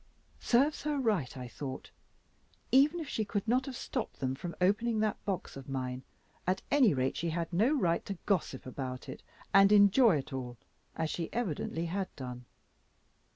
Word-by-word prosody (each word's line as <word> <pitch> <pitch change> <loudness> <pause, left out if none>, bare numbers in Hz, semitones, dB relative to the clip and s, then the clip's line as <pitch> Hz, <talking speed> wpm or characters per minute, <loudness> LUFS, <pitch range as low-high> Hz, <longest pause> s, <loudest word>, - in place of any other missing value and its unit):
"Serves 275 +5 +2
her 300 0 -1
right," 205 - 0
I 125 -1 -6
thought. 130 +2 -7 0.8
Even 290 +6 +5
if 320 - -5
she 220 - -1
could 205 0 -3
not 255 +4 +2
have 265 - -5
stopped 250 -5 -4
them 130 -1 -1
from 170 +5 -6
opening 215 +5 +2
that 215 -2 -1
box 195 -3 -3
of 135 0 -9
mine, 130 -1 -3 0.5
at 185 +1 0
any 280 -6 +5
rate 130 -2 0
she 170 - -1
had 170 +1 -3
no 215 +10 +3
right 170 -5 +1
to 195 - -4
gossip 175 -9 0
about 130 -1 -5
it, - - -8 0.3
and 195 +1 +7
enjoy 205 - +6
it 140 +1 -6
all, 125 -2 -5 0.4
as 160 -1 -1
she 170 -2 -3
evidently 170 -6 -2
had 190 +3 -2
done. 125 -2 -7
185 Hz, 175 wpm, -31 LUFS, 135-225 Hz, 0.8 s, and